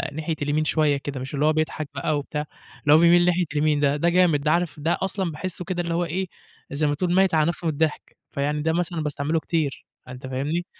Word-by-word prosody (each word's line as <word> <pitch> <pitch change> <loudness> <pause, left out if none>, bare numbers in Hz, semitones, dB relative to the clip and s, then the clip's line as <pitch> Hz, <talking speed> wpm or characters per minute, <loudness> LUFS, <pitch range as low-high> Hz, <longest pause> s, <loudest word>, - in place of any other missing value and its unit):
ناحية 160 +1 -2
اليمين 150 +2 0
شوية 150 -2 +2
كده، 140 -1 -5
مش 130 +3 -7
اللي 145 +1 +1
هو 155 - +4
بيضحك 155 -1 -2
بقى 150 +2 0
وبتاع، 150 +1 -4 0.4
اللي 145 - +5
هو - - +8
بيميل 170 +1 +5
ناحية 180 0 +2
اليمين 150 0 +2
ده، 145 -1 +2
ده 170 +4 +2
جامد 170 -4 +3
ده. 150 +1 +1
عارف 170 -2 0
ده 160 +3 0
أصلًا 190 -2 -1
باحسه 180 +3 -5
كده 175 0 -2
اللي 170 -1 -3
هو 175 +1 0
إيه، 185 +3 -2 0.4
زي 145 +2 0
ما 145 - +1
تقُول 175 +3 0
ميّت 190 -2 +4
على 155 -1 +4
نفسه 175 0 -2
من 160 - +1
الضحك، 155 +1 -2
فيعني 145 +2 -1
ده 160 +1 +1
مثلًا 170 -1 -1
باستعمله 150 +2 -1
كتير، 160 -4 -2 0.2
فأنت 130 +1 -9
فاهمني؟ 145 +7 -2
155 Hz, 235 wpm, -24 LUFS, 145-170 Hz, 0.4 s, هو